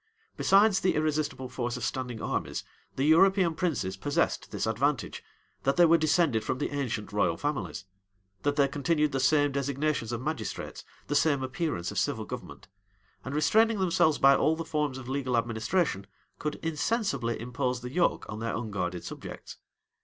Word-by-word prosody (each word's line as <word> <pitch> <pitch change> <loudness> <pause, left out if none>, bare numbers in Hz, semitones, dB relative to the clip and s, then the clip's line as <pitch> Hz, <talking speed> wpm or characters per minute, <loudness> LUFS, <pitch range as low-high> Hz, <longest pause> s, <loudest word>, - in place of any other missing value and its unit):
Besides 200 0 +4
the 185 - +1
irresistible 155 -3 -1
force 125 -1 -3
of 125 - -6
standing 125 -3 -3
armies, - - -2 0.3
the 135 - -1
European 180 +2 +5
princes 150 - -1
possessed 145 +9 0
this - - -2
advantage, - - -1 0.4
that 135 - +1
they 175 - +7
were 165 0 +5
descended 155 -7 +2
from - - -2
the - - -2
ancient 125 -8 -3
royal 105 - +1
families; 145 -9 -3 0.6
that 145 0 0
they 140 -2 +4
continued 150 +2 +1
the 135 - -1
same 145 +2 +3
designations 140 -2 -1
of 120 - -2
magistrates, 130 -5 -4 0.2
the - - -3
same 145 -2 +2
appearance 130 - -2
of - - -1
civil - - -1
government; - - -8 0.6
and 130 +2 -5
restraining 220 +9 +3
themselves 175 -4 +3
by 135 0 +6
all 155 +3 +2
the 165 0 -5
forms 150 -4 -1
of 130 -2 -9
legal 130 -2 -1
administration, 115 - 0 0.3
could 150 0 -2
insensibly 155 - -1
impose 125 +1 -2
the 125 +1 -6
yoke 175 +1 +1
on 105 - -6
their 115 +1 -2
unguarded 90 -6 -3
subjects. - - -8
140 Hz, 165 wpm, -28 LUFS, 125-160 Hz, 0.6 s, they